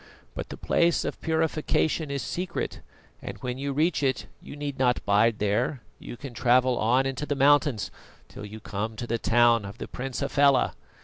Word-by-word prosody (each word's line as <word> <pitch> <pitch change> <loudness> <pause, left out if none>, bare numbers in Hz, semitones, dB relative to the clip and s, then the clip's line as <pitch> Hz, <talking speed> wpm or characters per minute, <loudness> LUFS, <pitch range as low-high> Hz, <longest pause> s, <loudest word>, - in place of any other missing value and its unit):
But - - -6
the - - -7
Place 170 0 +2
of - - -5
Purification 160 -1 0
is 140 -1 -3
secret, 180 0 -4 0.4
and - - -7
when 125 0 -3
you 140 +1 -2
reach 155 +3 +1
it 130 -3 0 0.2
you - - -10
need 145 -2 -5
not 125 -2 +2
bide 105 +2 +3
there, 115 +5 0 0.2
you 120 - -9
can 135 -2 -8
travel 125 +1 +3
on 125 +5 +3
into 135 +2 -3
the 145 - 0
mountains 140 -4 +3 0.4
till - - -10
you 105 +1 -8
come 110 +1 -4
to 120 - -5
the 115 0 -2
town 120 -1 +4
of 100 0 -8
the - - -6
Prince 130 +1 -5
Hafela. 140 -1 +3
130 Hz, 185 wpm, -26 LUFS, 115-145 Hz, 0.4 s, town